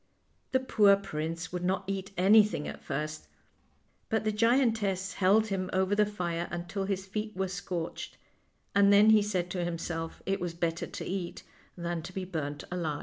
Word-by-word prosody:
The 260 - +3
poor 210 -6 +5
prince 165 -2 -4
would 180 0 -3
not 190 +2 0
eat 195 0 -3
anything 205 - +5
at 75 0 -7
first, 155 - -4 0.8
but 220 0 +1
the 215 - +1
giantess 220 -4 +2
held 200 +3 +4
him 185 -2 -2
over 190 +1 +2
the 210 0 +3
fire 175 -4 -3
until 175 +3 -3
his 190 -1 -2
feet 210 +1 -4
were 190 0 0
scorched, 180 -3 -5 0.6
and 200 0 +5
then 205 +2 +7
he 215 -1 +6
said 185 -4 -1
to 180 -1 -1
himself 165 -1 -4
it 195 +1 0
was 175 -2 -3
better 170 -1 -1
to - - -6
eat 185 -2 -4 0.3
than 170 -1 -3
to 175 +3 -9
be 190 0 -3
burnt 150 -5 -4
alive. 160 -5 -2
185 Hz, 175 wpm, -30 LUFS, 170-205 Hz, 0.8 s, then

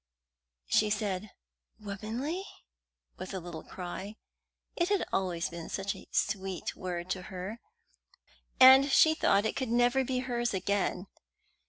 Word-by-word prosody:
She 210 - +3
said 205 -1 -2 0.5
"Womanly?" 220 - -4 0.7
with 185 +1 -6
a - - -2
little 170 -2 -8
cry. 190 +5 -7 0.6
It 345 +1 +1
had 405 -2 +1
always 180 -3 0
been 170 -1 -7
such 195 0 -2
a - - -13
sweet 195 -2 -2
word 175 -1 -4
to 185 - -2
her, 190 +5 -6 1.0
and 265 +2 +9
she 315 +3 +6
thought 205 -9 +2
it 220 - -1
could 260 -3 -2
never 245 +3 +3
be 260 0 -2
hers 240 -4 -1
again! 190 -1 -1
205 Hz, 135 wpm, -30 LUFS, 185-245 Hz, 1.0 s, and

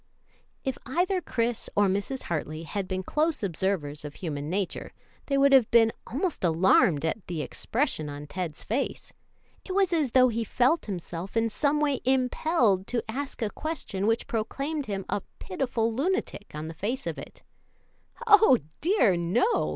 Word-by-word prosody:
If 265 -2 -3
either 360 +7 0
Chris 235 -6 -2
or 205 - +4
Mrs. 200 +7 -1
Hartley 155 -1 -3
had 190 +3 -3
been 185 0 -3
close 305 - 0
observers 170 -5 -2
of 150 -1 -7
human 150 -4 -4
nature, 190 +1 -3 0.3
they 275 - +1
would 275 0 +5
have 260 -5 +6
been 225 -1 +5
almost 315 - -2
alarmed 170 - +4
at 175 +4 -3
the 165 -4 -3
expression 220 - -1
on 145 +1 -7
Ted's 165 -1 -5
face. 255 +6 -3 0.5
It 375 - -5
was 380 -2 +2
as 300 -7 +1
though 255 -1 +6
he 230 0 -1
felt 255 +8 +1
himself 180 +1 -5
in 225 0 +2
some 295 +5 +1
way 285 -3 +1
impelled 250 - +2
to 235 -2 -1
ask 265 +2 -4
a 210 - -1
question 250 -11 -3
which 225 +1 +1
proclaimed 275 +6 -3
him 195 -2 -3
a 205 - -1 0.2
pitiful 230 +2 -1
lunatic 285 - -1
on 155 +1 -5
the 165 - -6
face 225 +11 -3
of - - -3
it. - - -11 0.8
"Oh, 415 - +7 0.2
dear, 320 - +3
no!" 180 - +1
225 Hz, 165 wpm, -27 LUFS, 185-275 Hz, 0.8 s, Oh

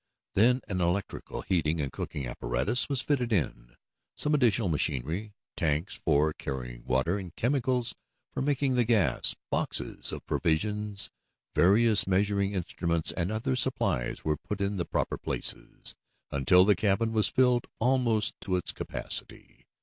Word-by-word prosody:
Then 125 +6 +4
an 95 -2 -2
electrical 90 +3 -2
heating 80 -3 0
and 70 -3 -2
cooking 70 +1 -5
apparatus 60 - +1
was 135 -2 +1
fitted 125 -5 0
in; - - -1 0.4
some 150 - 0
additional 120 -7 +3
machinery, 80 - -1 0.2
tanks 80 +2 0
for 75 0 +2
carrying 60 -4 -6
water, 65 +10 +1
and 90 -4 -9
chemicals 125 -1 +1 0.4
for - - -2
making 140 -1 +1
the 125 -1 +3
gas, 110 -5 +2 0.2
boxes - - -2
of - - -7
provisions, 105 +5 0 0.4
various 105 +2 +5
measuring 100 +1 +1
instruments 85 -3 -1
and 90 +2 -2
other 110 - -1
supplies - - -1
were 75 -1 +1
put 105 +6 -6
in 100 0 -1
the 85 - -1
proper - - -2
places, - - -2 0.4
until 90 +7 +5
the 105 0 +5
cabin 110 +4 +1
was 110 -1 +4
filled 125 -2 +2
almost 115 -4 +2
to 95 - -1
its 90 - -1
capacity. - - -5
100 Hz, 140 wpm, -29 LUFS, 80-115 Hz, 0.4 s, various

